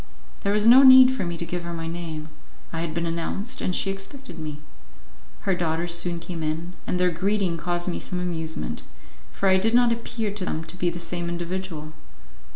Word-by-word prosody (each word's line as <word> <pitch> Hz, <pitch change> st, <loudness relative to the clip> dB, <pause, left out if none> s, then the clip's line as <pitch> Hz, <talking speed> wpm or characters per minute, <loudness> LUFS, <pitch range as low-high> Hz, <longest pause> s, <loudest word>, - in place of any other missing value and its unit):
There 200 Hz, -, 0 dB
was 210 Hz, +1 st, +2 dB
no 245 Hz, +3 st, +9 dB
need 260 Hz, -1 st, +9 dB
for 260 Hz, -, -2 dB
me 170 Hz, -1 st, -3 dB
to 170 Hz, -, -3 dB
give 175 Hz, +1 st, -4 dB
her 170 Hz, 0 st, -5 dB
my 165 Hz, 0 st, -4 dB
name; 165 Hz, -2 st, -5 dB, 0.4 s
I 165 Hz, -, -2 dB
had 165 Hz, -1 st, -2 dB
been 170 Hz, +1 st, -2 dB
announced, 170 Hz, +7 st, -2 dB
and 180 Hz, -, 0 dB
she 195 Hz, -, +1 dB
expected 195 Hz, -, -7 dB
me. 150 Hz, -2 st, -6 dB, 0.8 s
Her 195 Hz, -, +1 dB
daughters 170 Hz, -1 st, -1 dB
soon 170 Hz, 0 st, -2 dB
came 170 Hz, -1 st, -6 dB
in, 160 Hz, +3 st, -3 dB
and 180 Hz, -, 0 dB
their 180 Hz, 0 st, +3 dB
greeting 190 Hz, +1 st, 0 dB
caused 175 Hz, +1 st, -2 dB
me 180 Hz, -, -1 dB
some 180 Hz, -, -3 dB
amusement, 160 Hz, -3 st, -3 dB, 0.5 s
for 195 Hz, -, -1 dB
I 190 Hz, 0 st, +6 dB
did 225 Hz, +5 st, +2 dB
not 245 Hz, -1 st, +5 dB
appear 230 Hz, -2 st, -2 dB
to 200 Hz, -1 st, -5 dB
them 160 Hz, -3 st, -2 dB
to 170 Hz, -, -9 dB
be 180 Hz, -1 st, 0 dB
the 170 Hz, -, -5 dB
same 170 Hz, 0 st, -3 dB
individual. 170 Hz, -2 st, -4 dB
175 Hz, 205 wpm, -25 LUFS, 165-195 Hz, 0.8 s, no